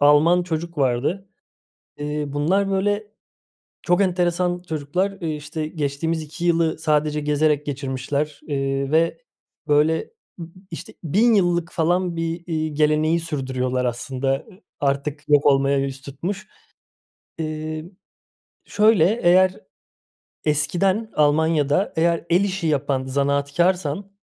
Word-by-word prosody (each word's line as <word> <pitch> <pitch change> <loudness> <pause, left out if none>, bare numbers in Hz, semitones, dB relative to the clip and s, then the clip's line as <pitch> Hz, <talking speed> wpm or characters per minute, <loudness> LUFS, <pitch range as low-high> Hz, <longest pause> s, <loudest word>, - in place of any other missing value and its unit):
Alman 150 +5 +5
çocuk 170 -1 -4
vardı. 140 +9 0 0.7
Eee, 150 0 -3
bunlar, 175 +8 +1
böyle, 205 +2 0 0.7
çok 175 +1 +2
enteresan 180 -1 0
çocuklar, 160 +6 -1
eee, 160 -3 -2
işte, 155 +1 -5
geçtiğimiz 155 +1 -2
2 160 +3 -7
yılı 165 -2 +2
sadece 150 -1 +1
gezerek 150 0 +1
geçirmişler, 140 +1 -3
eee, 135 -1 -1
ve, 165 +1 +2 0.5
böyle, 150 +2 +3
ı 440 - -16
ı - - -6 0.2
işte, 165 - -8
1.000 220 +9 +3
yıllık 175 -3 +1
falan 175 +1 0
bir, 165 +1 -3
iii, 155 -3 -2
geleneği 155 +2 +2
sürdürüyorlar 130 -5 -2
aslında. 130 +2 -1
I 185 +8 -18 0.2
artık 140 +1 -2
yok 145 -1 +4
olmaya 140 0 +4
yüz 135 0 -3
tutmuş. 180 +10 -5 0.9
İii, 155 +2 -5 0.7
şöyle, 215 0 +3
eğer, 185 +2 +4 0.9
eskiden 180 +9 +1
Almanya'da 150 +3 +2
eğer 170 0 +1
el 180 +4 +4
işi 190 -4 -2
yapan 140 -3 0
zanaatkârsan, 145 +7 0
155 Hz, 115 wpm, -22 LUFS, 145-175 Hz, 0.9 s, Alman